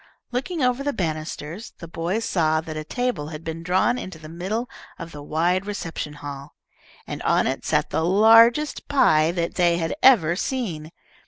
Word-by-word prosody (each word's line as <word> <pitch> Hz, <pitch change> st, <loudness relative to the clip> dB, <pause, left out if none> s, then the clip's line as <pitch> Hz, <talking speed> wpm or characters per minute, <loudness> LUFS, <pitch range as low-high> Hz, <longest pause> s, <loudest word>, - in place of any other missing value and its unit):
Looking 290 Hz, +5 st, -2 dB
over 250 Hz, +1 st, +1 dB
the 285 Hz, 0 st, -1 dB
banisters, 160 Hz, +2 st, -4 dB
the 170 Hz, -, -9 dB
boys 175 Hz, +7 st, -2 dB
saw 160 Hz, -3 st, +1 dB
that 160 Hz, -1 st, -7 dB
a 155 Hz, -, -4 dB
table 245 Hz, -3 st, -2 dB
had 155 Hz, 0 st, -8 dB
been 165 Hz, 0 st, -5 dB
drawn 185 Hz, +8 st, +1 dB
into 185 Hz, -3 st, -7 dB
the 155 Hz, -1 st, -11 dB
middle 190 Hz, +9 st, -3 dB, 0.3 s
of 165 Hz, -1 st, -8 dB
the 145 Hz, -, -9 dB
wide 175 Hz, +6 st, 0 dB
reception 165 Hz, -7 st, -5 dB
hall, 145 Hz, -1 st, -9 dB, 0.5 s
and -, -, -6 dB
on -, -, +2 dB
it -, -, -2 dB
sat -, -, 0 dB
the 160 Hz, -, 0 dB
largest 225 Hz, -, +5 dB
pie 160 Hz, -, +4 dB
that 170 Hz, -1 st, -2 dB
they 175 Hz, -2 st, +2 dB
had 165 Hz, -1 st, -2 dB
ever 180 Hz, -11 st, +5 dB
seen. 180 Hz, -, -3 dB
170 Hz, 175 wpm, -23 LUFS, 155-225 Hz, 0.5 s, largest